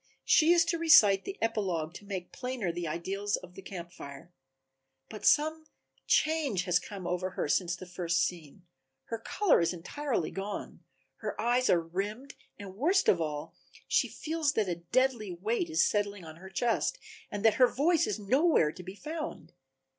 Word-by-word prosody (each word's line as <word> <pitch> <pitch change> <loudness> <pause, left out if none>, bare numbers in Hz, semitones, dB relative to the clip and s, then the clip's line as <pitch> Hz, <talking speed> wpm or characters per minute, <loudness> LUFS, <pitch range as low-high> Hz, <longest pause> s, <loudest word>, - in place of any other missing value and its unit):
She 320 +1 +5
is 340 -1 +5
to 340 -1 -1
recite 210 -12 +6
the 390 - -6
epilogue, 185 -8 -1
to 205 - -11
make 190 -3 -5
plainer 250 -8 -3
the 170 0 -4
ideals 195 +6 -2
of 180 0 -10
the 195 - -10
Camp 175 -2 -8
Fire. 140 +3 -11 0.8
But 215 - -3
some 315 +1 +3 0.4
change 305 - +2
has 175 -2 +2
come 195 -3 -8
over 180 +1 -1
her 185 - -3
since 175 +3 +1
the 185 - -10
first 175 -1 0
scene, 170 0 -5 0.4
her 230 - -3
color 365 - +2
is 170 - +1
entirely 230 - -3
gone, 200 +1 -6 0.4
her - - -5
eyes 245 +2 +2
are 175 - +5
rimmed 205 +10 -5 0.2
and, 195 -2 -9
worst 360 - +2
of 175 - +4
all, 150 -2 -4 0.3
she - - +2
feels 315 -2 -1
that 215 -3 +1
a 180 - 0
deadly 220 +2 0
weight 225 - -2
is 320 - +3
settling 205 -3 -1
on 160 0 -10
her 190 +2 -11
chest 235 - 0 0.3
and 205 +1 -4
that 220 - +6
her 250 - +9
voice 310 +6 +2
is 210 - -1
nowhere 235 - +3
to 180 - -11
be 185 +2 -9
found. 310 +6 -6
205 Hz, 175 wpm, -30 LUFS, 175-265 Hz, 0.8 s, her